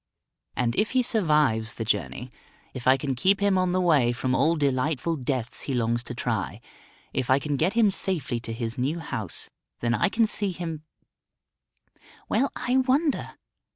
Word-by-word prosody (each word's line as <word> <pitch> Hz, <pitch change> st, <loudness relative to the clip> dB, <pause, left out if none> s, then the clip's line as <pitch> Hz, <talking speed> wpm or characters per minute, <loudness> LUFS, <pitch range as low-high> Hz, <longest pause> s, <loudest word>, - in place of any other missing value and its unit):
And 120 Hz, -1 st, 0 dB
if 215 Hz, -, +1 dB
he 255 Hz, -1 st, +3 dB
survives 150 Hz, -, +1 dB
the 115 Hz, -, -4 dB
journey; 125 Hz, +2 st, -2 dB, 0.4 s
if 130 Hz, -2 st, -5 dB
I 130 Hz, +1 st, +6 dB
can 135 Hz, 0 st, -2 dB
keep 190 Hz, +11 st, +2 dB
him 200 Hz, -1 st, +3 dB
on 185 Hz, -1 st, +2 dB
the 185 Hz, -, +1 dB
way 150 Hz, -9 st, +4 dB
from 125 Hz, +1 st, -1 dB
all 155 Hz, +6 st, +3 dB
delightful 145 Hz, +2 st, 0 dB
deaths 130 Hz, -4 st, -3 dB
he 135 Hz, -, 0 dB
longs 120 Hz, 0 st, +1 dB
to -, -, -6 dB
try; -, -, -2 dB, 0.5 s
if 125 Hz, -, -2 dB
I 130 Hz, -, +6 dB
can 145 Hz, +1 st, -2 dB
get 165 Hz, +8 st, +1 dB
him 225 Hz, -3 st, +4 dB
safely 155 Hz, -11 st, -2 dB
to 115 Hz, -, -7 dB
his 115 Hz, +1 st, -3 dB
new 140 Hz, +7 st, 0 dB
house, 110 Hz, -, -4 dB, 0.3 s
then 120 Hz, 0 st, 0 dB
I 190 Hz, -, +2 dB
can 225 Hz, +2 st, +3 dB
see 205 Hz, -3 st, -2 dB
him 165 Hz, -3 st, -5 dB, 1.5 s
Well, 265 Hz, +6 st, +1 dB
I 250 Hz, +2 st, 0 dB
wonder. 270 Hz, +4 st, +1 dB
150 Hz, 175 wpm, -26 LUFS, 125-190 Hz, 1.5 s, I